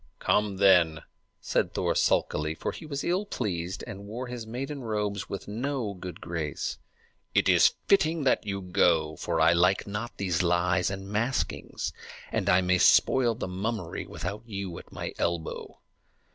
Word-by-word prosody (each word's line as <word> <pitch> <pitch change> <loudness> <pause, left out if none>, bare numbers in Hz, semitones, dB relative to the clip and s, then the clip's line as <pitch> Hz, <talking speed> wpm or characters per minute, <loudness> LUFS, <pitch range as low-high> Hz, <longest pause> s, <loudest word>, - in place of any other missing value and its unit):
"Come, 105 -2 +1
then," 90 -5 +5 0.4
said - - 0
Thor - - +1
sulkily, 75 +1 +1
for - - -3
he 160 - -9
was 140 -2 -3
ill 180 +4 +1
pleased, 95 - -3
and 100 +1 -8
wore 120 +5 -5
his 120 -2 -6
maiden 135 +5 -4
robes 105 -4 -2
with 100 - -5
no 120 0 -2
good 90 -1 -8
grace. 80 -4 -4 0.6
"It - - +4
is - - +5
fitting 165 -5 +3
that 130 - +2
you 100 -2 -3
go; 80 -4 +2
for 85 -1 -2
I 80 +1 +6
like 90 +2 +3
not 105 +4 -5
these 90 -3 0
lies 90 +1 +2
and 95 0 -5
maskings, 115 +5 -2 0.4
and - - 0
I 90 +1 +5
may 90 0 +2
spoil 120 +3 +5
the 110 - -4
mummery 95 -1 -3
without 100 +4 -5
you 100 -5 -5
at - - -15
my - - -5
elbow." 85 -2 -3
100 Hz, 160 wpm, -28 LUFS, 90-115 Hz, 0.6 s, I